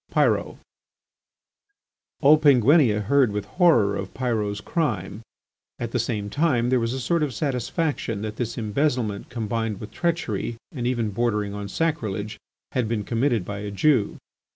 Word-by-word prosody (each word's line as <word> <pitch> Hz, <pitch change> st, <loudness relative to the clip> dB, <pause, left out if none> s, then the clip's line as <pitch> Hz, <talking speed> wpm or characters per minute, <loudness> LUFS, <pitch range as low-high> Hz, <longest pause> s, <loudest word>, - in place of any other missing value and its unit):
PYROT -, -, +1 dB, 1.6 s
All 150 Hz, +1 st, +7 dB
Penguinia 135 Hz, -5 st, +5 dB
heard 135 Hz, +1 st, +3 dB
with 105 Hz, 0 st, -3 dB
horror 120 Hz, -, +3 dB
of 95 Hz, -1 st, -6 dB
Pyrot's 110 Hz, -5 st, -1 dB
crime; 110 Hz, -, -2 dB, 0.6 s
at 120 Hz, -1 st, -4 dB
the 125 Hz, -, 0 dB
same 110 Hz, -3 st, -2 dB
time 125 Hz, -1 st, +1 dB
there 130 Hz, -, +4 dB
was 115 Hz, +1 st, -1 dB
a 130 Hz, -, -3 dB
sort 170 Hz, +6 st, 0 dB
of 140 Hz, -6 st, -1 dB
satisfaction 125 Hz, -, -2 dB
that 110 Hz, -1 st, -5 dB
this 120 Hz, -2 st, -3 dB
embezzlement 115 Hz, -2 st, -1 dB
combined 115 Hz, -2 st, -2 dB
with 105 Hz, -, -8 dB
treachery 165 Hz, -, -2 dB
and 120 Hz, -4 st, -3 dB
even 115 Hz, -4 st, 0 dB
bordering 105 Hz, -2 st, -1 dB
on 100 Hz, -1 st, -5 dB
sacrilege, 110 Hz, -10 st, -2 dB, 0.3 s
had 125 Hz, -3 st, 0 dB
been 110 Hz, -2 st, -1 dB
committed 115 Hz, -3 st, 0 dB
by 100 Hz, +1 st, -5 dB
a 105 Hz, 0 st, -5 dB
Jew. 110 Hz, +2 st, +2 dB
115 Hz, 150 wpm, -24 LUFS, 105-140 Hz, 1.6 s, All